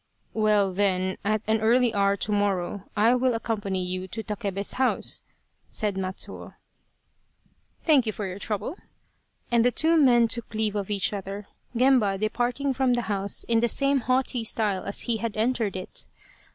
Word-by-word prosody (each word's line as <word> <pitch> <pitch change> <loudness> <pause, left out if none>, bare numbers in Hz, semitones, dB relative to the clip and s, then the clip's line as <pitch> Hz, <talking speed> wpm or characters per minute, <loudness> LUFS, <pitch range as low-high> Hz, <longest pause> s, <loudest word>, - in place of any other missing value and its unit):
" - - -45
Well, 210 -3 +2
then 185 -1 0
at 215 +1 0
an 220 0 +1
early 235 +1 +3
hour 200 -1 +2
to 210 - -2
morrow 200 -2 -1
I 225 +4 +5
will 250 -1 +2
ac 225 - -3
company 200 -5 -2
you 185 +1 -3
to 220 +4 -6
Takebe's 200 -2 -3
house," 260 - +1 0.5
said 210 -2 -1
Matsuo. 190 0 -5 0.7
" - - -40
Thank 285 -8 +4
you - - +1
for 210 0 -5
your 190 +1 -6
trouble," 210 - -3 0.7
and 235 -1 +4
the 245 - +5
two 320 +6 +2
men 240 -4 +5
took 225 -1 -3
leave 215 -1 +1
of 205 -2 -3
each 205 0 0
other, 200 +1 -5 0.3
Gemba 245 -6 +4
departing 245 +6 -1
from 255 -1 +2
the 240 - -1
house 200 0 +2
in 230 -1 +2
the 235 +1 +1
same 275 +3 +2
haughty 255 -1 0
style 210 -4 0
as 200 - -2
he 235 -2 0
had 225 -1 -4
entered 225 -3 0
it. 185 - -7
215 Hz, 180 wpm, -26 LUFS, 200-240 Hz, 0.7 s, I